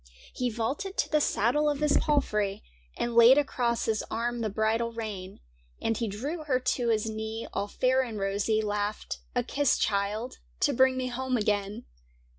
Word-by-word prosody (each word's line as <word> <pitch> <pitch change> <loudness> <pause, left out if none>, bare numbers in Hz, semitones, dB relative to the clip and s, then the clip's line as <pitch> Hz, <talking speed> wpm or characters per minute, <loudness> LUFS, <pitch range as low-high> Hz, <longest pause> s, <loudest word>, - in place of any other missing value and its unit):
He 250 -1 -1
vaulted 260 - -3
to - - +1
the 305 -1 +3
saddle 290 +6 +2
of 290 -2 -1
his 300 -1 +2
palfrey. 210 -10 0 0.3
And 240 - -1
laid 235 +3 +8
across 245 -5 0
his 220 -1 0
arm 235 +1 -2
the 220 - -1
bridle 220 +3 0
rein; 205 -5 -6 0.4
And 225 - 0
he 230 +1 -2
drew 275 - -4
her 255 -4 +1
to 255 -1 0
his 220 -1 +1
knee, 220 +1 -4
all 200 - -1
fair 255 +5 +2
and 235 -4 -4
rosy. 200 +2 0
Laughed 210 0 -3
— - - -35
' - - -34
A 245 - +2
kiss, 280 +2 +1
child, 210 +4 -1 0.2
to 290 - +3
bring 260 +1 +4
me 255 -1 -1
home 255 +1 -1
again. 205 -2 -1
230 Hz, 185 wpm, -28 LUFS, 215-260 Hz, 0.4 s, laid